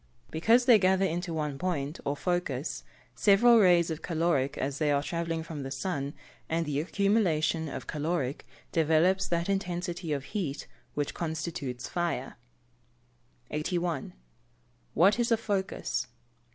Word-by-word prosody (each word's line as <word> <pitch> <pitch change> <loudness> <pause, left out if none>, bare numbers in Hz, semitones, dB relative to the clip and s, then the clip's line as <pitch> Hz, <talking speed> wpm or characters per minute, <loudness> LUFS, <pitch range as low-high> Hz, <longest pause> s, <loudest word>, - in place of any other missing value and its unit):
_ - - -25
Because 225 +10 +4
they 240 -4 +7
gather 190 0 +3
into 175 0 -2
one 150 -3 -2
point, 160 -5 -2
or 140 - -1
focus, 175 -6 -2 0.3
several 230 +4 +6
rays 175 -4 +5
of 160 0 -4
caloric 160 -5 0
as 140 +1 -2
they 155 -2 +2
are 140 0 +2
travelling 165 0 -2
from 160 -3 -6
the 135 - -5
sun, 140 0 -3 0.3
and 165 +1 0
the 145 -2 -1
accumulation 170 -4 +1
of - - -6
caloric 150 -5 -2 0.2
developes 165 +4 +3
that 170 0 0
intensity 180 -3 -2
of 140 -2 -1
heat 155 -5 -4 0.3
which 145 -1 -1
constitutes 155 -6 -4
fire. 170 -7 -2 1.2
81. 170 -1 -2 0.8
_What 195 +7 +5
is 235 0 +1
a 230 - +5
focus? 200 -4 -2
165 Hz, 140 wpm, -29 LUFS, 150-185 Hz, 1.2 s, they